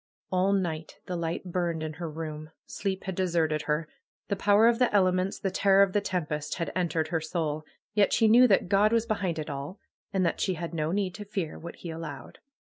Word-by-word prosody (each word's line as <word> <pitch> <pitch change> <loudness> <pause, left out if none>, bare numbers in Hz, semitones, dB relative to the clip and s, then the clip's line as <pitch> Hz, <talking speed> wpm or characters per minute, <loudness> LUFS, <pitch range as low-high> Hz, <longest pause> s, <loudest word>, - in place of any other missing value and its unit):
All 185 +1 +2
night 165 -5 -2
the 180 - -4
light 170 +1 -3
burned 170 -3 -1
in 155 0 -4
her 165 - -3
room. 155 -1 -6 0.2
Sleep 190 -2 -3
had 190 - -3
deserted 170 -4 +1
her. 150 +1 0 0.4
Tlie 200 - 0
power 205 +2 +5
of 235 0 +3
the 250 - +3
elements, 185 -1 +2
the 195 - -2
terror 195 +1 +5
of 195 -2 0
the 205 - +2
tempest, 155 -6 -2
had 170 - -3
entered 165 -3 0
her 165 -1 0
soul. 155 -2 -2 0.3
Yet 205 -2 +3
she 225 - +4
knew 245 +3 +7
that 195 -4 +3
God 205 +3 +4
was 230 -1 +2
behind 195 -7 -1
it 155 - -4
all, 140 +6 -5 0.3
and 190 -2 +1
that 170 - -1
she 185 - +1
had 170 0 -5
no 155 -1 -1
need 190 -1 0
to 210 - -7
fear 195 -5 -4
what 170 +1 -8
He 170 - -7
allowed. 150 -6 -8
180 Hz, 215 wpm, -28 LUFS, 160-195 Hz, 0.4 s, knew